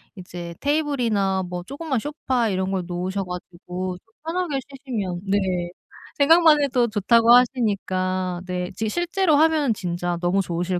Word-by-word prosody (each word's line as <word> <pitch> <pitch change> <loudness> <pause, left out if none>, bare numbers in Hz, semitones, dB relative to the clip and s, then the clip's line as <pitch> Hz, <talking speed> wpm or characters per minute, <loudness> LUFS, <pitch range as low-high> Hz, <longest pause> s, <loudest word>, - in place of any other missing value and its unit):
이제 175 -2 -8
테이블이나 245 -11 0
뭐 175 -1 -5
쪼그만 280 - -3
소파 260 -5 -1
이런 190 0 -1
걸 185 -2 -1
놓으셔 185 +2 -2
가지고 180 0 -6
좀 225 +4 -28
편하게 330 -4 -1
쉬시면 220 -10 -4
네. 200 +1 +2 0.8
생각만 315 +1 +6
해도 250 -3 +2
좋다고 230 +2 +3
하시니까 185 -7 +1
네 180 -1 -3
지금 220 -1 -2
실제로 345 - +1
하면 310 -6 +3
진짜 175 -2 -3
너무 180 +3 +2
좋으실 175 0 -2
205 Hz, 315 characters per minute, -23 LUFS, 180-275 Hz, 0.8 s, 생각만